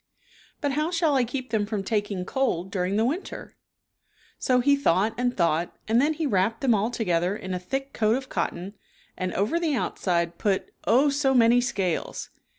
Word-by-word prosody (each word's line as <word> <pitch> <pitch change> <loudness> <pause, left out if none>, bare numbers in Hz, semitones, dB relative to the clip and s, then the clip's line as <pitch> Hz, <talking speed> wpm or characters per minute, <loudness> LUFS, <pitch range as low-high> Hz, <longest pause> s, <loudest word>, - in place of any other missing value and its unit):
But 285 -2 0
how 305 +4 0
shall 330 -3 +1
I 265 -2 +3
keep 250 +1 -5
them 210 -2 0
from 210 -2 -2
taking 205 -3 -2
cold 190 -8 -1
during 185 0 -1
the 220 +2 +2
winter?" 320 +10 -4 0.8
So 255 -1 +2
he 280 +3 +4
thought 215 -5 +2
and 245 +1 -1
thought, 170 -1 0
and 230 +3 +3
then 300 +3 +2
he 320 - -2
wrapped 215 -1 +1
them 260 -4 +3
all 215 +2 +1
together 180 -5 0
in 185 -2 -5
a 180 - -2
thick 270 +9 -4
coat 215 +1 +2
of 265 0 -4
cotton 180 0 -3 0.4
and 185 0 -3
over 215 - +1
the 320 -4 0
outside 170 -7 -1
put, 195 -3 0 0.2
oh, 260 +6 +5
so 275 -1 +1
many 240 0 +5
scales 195 -8 -2
225 Hz, 185 wpm, -26 LUFS, 190-270 Hz, 0.8 s, oh